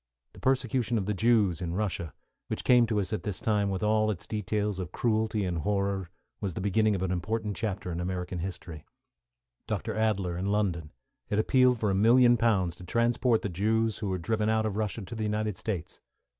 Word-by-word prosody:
The - - -13
persecution 125 -2 +1
of 100 - -1
the 105 - 0
Jews 105 -5 +2
in 85 -1 -3
Russia, 95 -5 -2 0.4
which - - -3
came 120 -2 +5
to 110 -2 0
us 100 +1 -3
at 110 - -1
this 105 -4 -4
time 105 -2 +1
with 95 +1 -2
all 110 0 +2
its 100 -5 -4
details 105 -1 -2
of 90 -1 -5
cruelty 110 -2 0
and 85 -2 -2
horror, 100 0 -1 0.3
was 95 -5 -3
the - - -3
beginning 105 +2 +2
of 95 - -2
an 95 - -1
important 105 +3 -2
chapter 100 -4 -3
in 85 - -3
American 90 0 -3
history. 85 -4 -6 0.8
Dr. - - -2
Adler, 100 -5 0
in 95 - -2
London, 95 -7 0 0.4
had 105 - 0
appealed 125 +3 +4
for 105 -2 +1
a - - +1
million 120 +5 +6
pounds 105 -7 +1
to - - -11
transport 115 +3 +1
the - - 0
Jews 110 +4 0
who 105 -2 -2
were 95 - -1
driven 105 +4 0
out 110 0 +2
of 105 -2 -2
Russia 110 0 -2
to 95 - -8
the 110 - -5
United 105 -1 -1
States. 95 -4 -4
105 Hz, 205 wpm, -28 LUFS, 95-110 Hz, 0.8 s, million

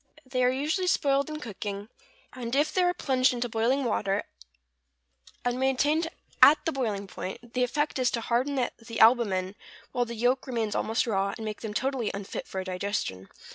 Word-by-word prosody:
= - - -22
Eggs 260 0 -16
are 250 0 +4
usually 305 +8 0
spoiled 280 -3 +2
in 305 0 -5
cooking; 205 -4 -5 0.5
if 260 +5 0
they 370 - +3
are 355 0 +4
plunged 260 -6 +2
into 245 0 -1
boiling 235 +5 +1
water, 205 -4 0 1.2
and 245 +1 0
maintained 290 +5 +2 0.3
at 300 +2 +9
the 325 - +1
boiling 220 -8 -2
point, 195 +5 -7
the 250 - +2
effect 295 +3 0
is 250 -1 +3
to 235 - -2
harden 250 +5 0 0.2
the 230 0 -6
albumen 205 -5 +4 0.4
while 245 -1 0
the 235 0 -6
yolk 245 +4 +1
remains 225 -4 -1
almost 225 +3 0
raw, 200 -3 0
and 220 - -6
make 215 -1 -5
them 215 -2 -5
totally 260 -2 0
unfit 200 -1 -6
for 190 0 -4
digestion. 180 - -3
245 Hz, 175 wpm, -28 LUFS, 210-270 Hz, 1.2 s, at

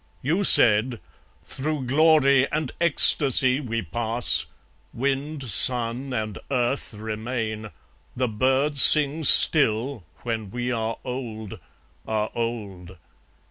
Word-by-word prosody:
You 165 +9 -1
said, 115 - +4 0.4
"Through 150 -1 -5
glory 140 -1 +2
and 150 -3 -4
ecstasy 140 -5 +3
we 115 -5 -5
pass; 115 +8 0 0.5
Wind, 140 +3 -4
sun, 125 +3 +2
and 110 -4 -6
earth 125 -2 -3
remain, 110 0 -6 0.5
the 125 0 -2
birds 130 +6 0
sing 150 +1 +5
still, 130 - +3 0.2
When 110 -4 -6
we 125 +3 -5
are 115 -1 -4
old, 115 -5 -8 0.5
are 110 -1 -3
old. 100 -6 -7
125 Hz, 100 wpm, -22 LUFS, 110-140 Hz, 0.5 s, sing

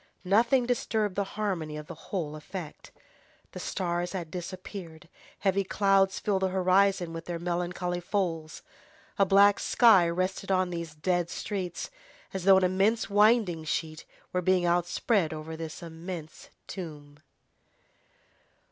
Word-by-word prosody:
Nothing 235 +6 +3
disturbed 220 -4 0
the 200 - 0
harmony 170 -8 -2
of 150 - -7
the 170 - -8 0.2
whole 160 -6 -3
effect. 155 +1 -8 0.6
The - - -8
stars 175 -1 -2
had 170 -4 -5
disappeared, 180 -2 -7 0.3
heavy 195 0 +2
clouds 195 0 +2
filled 195 -2 0
the 190 - +2
horizon 185 -1 +2
with 165 0 -6
their 175 -1 -3
melancholy 175 +1 -2
folds. 170 -4 -3 0.6
A 195 - +5
black 200 +1 +6
sky 200 -8 +5
rested 185 +3 -2
on 185 -1 +2
these 170 -3 -5
dead 175 +2 0
streets, 180 -2 -4 0.4
as 190 -2 -4
though 195 -1 +8
an 190 - +2
immense 195 +5 +1
winding 205 -5 +4
sheet 155 0 -3 0.3
were 180 - +1
being 185 0 +2
outspread 175 +1 +1
over 155 +1 -6
this 160 0 -7
immense 165 -1 -8 0.2
tomb. 150 -5 -8
180 Hz, 135 wpm, -28 LUFS, 165-195 Hz, 0.6 s, though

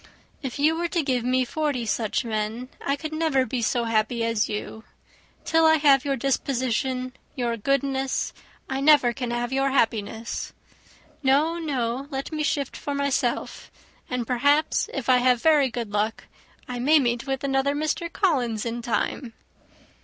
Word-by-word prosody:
"If 265 -3 -5
you 305 +3 +3
were 345 +1 -1
to 340 -2 0
give 255 -4 0
me 255 +1 +2
forty 290 -3 -2
such 220 +1 -1
men 220 +3 -3
I 280 +1 0
never 310 -4 +1
could 255 - -2
be 255 -3 -1
so 235 +1 +1
happy 225 +1 0
as 230 -2 0
you. 215 +1 -5 0.6
Till 325 0 +4
I 315 - +6
have 285 -3 +4
your 275 -1 +1
disposition, 255 0 -1 0.2
your 240 -2 -1
goodness, 270 +3 -1 0.3
I 265 0 -2
never 280 -5 +5
can 250 -1 -4
have 240 +1 -2
your 270 +1 +2
happiness. 225 -3 -1 0.7
No, 300 +5 +2
no, 265 -4 -2
let 270 0 -4
me 310 -1 -2
shift 290 -3 -1
for 285 - -4
myself; 280 -4 -1 0.4
and, 250 -2 -2
perhaps, 285 +6 +2
if 270 -4 -4
I 255 -1 +6
have 250 -1 +3
very 300 -4 +5
good 230 -2 -5
luck, 210 +2 -1 0.4
I 250 -2 -4
may 295 +6 +5
meet 240 -2 0
with 270 0 -2
another 275 +1 +1
Mr. 310 +3 -2
Collins 245 - 0
in 235 +1 -3
time." 235 0 -2
260 Hz, 160 wpm, -25 LUFS, 235-285 Hz, 0.7 s, I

